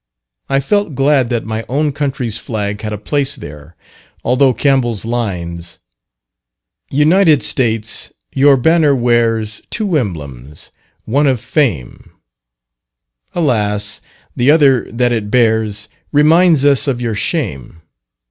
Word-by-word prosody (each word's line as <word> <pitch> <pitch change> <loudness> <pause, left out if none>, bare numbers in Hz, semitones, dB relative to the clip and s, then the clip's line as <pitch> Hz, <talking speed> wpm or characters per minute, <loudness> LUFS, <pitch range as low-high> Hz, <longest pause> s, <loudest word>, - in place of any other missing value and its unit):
I 135 0 +2
felt 205 +1 -1
glad 135 -2 +2
that 120 -2 -2
my 110 +1 -4
own 145 +3 0
country's 135 -6 -3
flag 105 -2 -4
had 105 - -4
a 105 - -3
place 140 +6 -2
there, 75 - -11 0.5
although 130 +1 +3
Campbell's 125 -5 0
lines" 90 -8 -4 1.1
"United 155 +2 +3
States, 115 -3 -2 0.2
your 140 0 +4
banner 155 +1 +3
wears, 115 -3 0
Two 200 -8 0
emblems, 75 - -7 0.3
one 145 +6 +1
of 130 -3 +1
fame; 110 - -2 1.3
Alas, 105 -9 0 0.3
the 125 +3 +2
other 145 -5 +4
that 120 +1 0
it 110 -3 -2
bears, 110 -3 +1 0.2
Reminds 155 0 +4
us 140 0 +3
of 130 -3 -1
your 115 -2 -2
shame. 90 - -4
120 Hz, 120 wpm, -15 LUFS, 105-145 Hz, 1.3 s, your